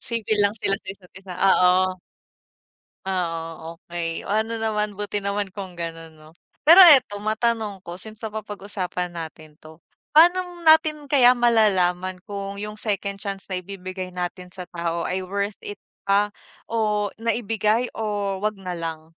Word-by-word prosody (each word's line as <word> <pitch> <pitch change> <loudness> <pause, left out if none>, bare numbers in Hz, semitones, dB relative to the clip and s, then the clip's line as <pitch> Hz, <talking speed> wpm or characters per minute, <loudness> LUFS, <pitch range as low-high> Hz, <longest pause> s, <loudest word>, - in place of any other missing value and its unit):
Civil 220 -2 -2
lang 200 +1 +2
sila 195 - +2
sa - - -16
isa't 185 -2 -19
isa, 190 -1 -9
oo. 185 -1 +4 1.1
Oo, 165 -3 -4
okey. 165 -1 -3
Oh, - - -3
ano 220 +2 0
naman, 210 -2 -1
buti 205 0 -3
naman 200 -1 -2
kung 190 -3 -8
ganon, 165 -1 -7
'no? 155 0 -16 0.3
Pero 335 +6 +9
eto, 250 -9 +5
matanong 220 -1 -1
ko. 170 - -7
Since 215 +1 -9
napapag-usapan 200 -4 -4
natin 155 -2 -8
to, 155 +1 -14 0.4
paano 350 +1 +4
natin 315 -2 +5
kaya 250 -3 +6
malalaman 185 -6 +2
kung 200 -1 -6
yung 210 +1 -6
second 200 -2 -2
chance 195 -2 -5
na 185 -2 -3
ibibigay 185 0 -7
natin 180 0 -5
sa 180 0 -8
tao 170 -1 -2
ay 185 +1 -2
worth 200 +2 -3
it 205 - -7 0.3
pa 205 +1 +3 0.4
o 210 -2 0
na 230 -1 +1
ibigay 225 +1 0
o 205 -3 -2
'wag 215 0 -1
na 185 -2 -5
lang? 160 -1 -6
200 Hz, 155 wpm, -23 LUFS, 180-215 Hz, 1.1 s, Pero